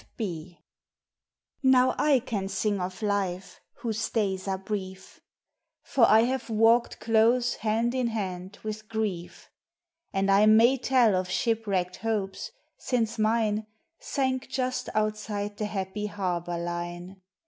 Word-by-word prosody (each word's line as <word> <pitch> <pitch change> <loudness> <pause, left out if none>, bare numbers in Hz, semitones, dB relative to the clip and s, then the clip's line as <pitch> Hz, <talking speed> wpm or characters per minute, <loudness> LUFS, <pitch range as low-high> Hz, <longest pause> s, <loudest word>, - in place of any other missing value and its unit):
F. - - -26
B._ 175 -5 -5 1.1
_NOW 260 -1 +5
I 295 -2 +4
can 220 -6 -3
sing 200 +1 -1
of 185 +4 -5
life, 195 -3 -2 0.2
whose 225 -2 -2
days 195 -4 -1
are 190 -1 0
brief, 190 -1 -6 0.6
For 235 -4 +4
I 220 +1 +7
have 255 +1 -1
walked 225 +2 +3
close 230 +2 +3
hand 225 +2 0
in 255 -2 0
hand 190 -3 -4
with 215 0 -6
grief. 210 -6 -4 0.6
And 195 0 +1
I 200 +2 +5
may 230 +5 +6
tell 245 -5 +3
of 185 0 -1
shipwrecked 200 -5 -1
hopes, 210 -4 -3 0.3
since 230 -3 -1
mine 215 -1 +1 0.3
Sank 260 -2 -1
just 255 -1 -2
outside 210 -1 -2
the 210 - -2
happy 205 +1 -3
harbor 175 -4 -3
line. 175 +2 -5
215 Hz, 130 wpm, -27 LUFS, 190-230 Hz, 1.1 s, I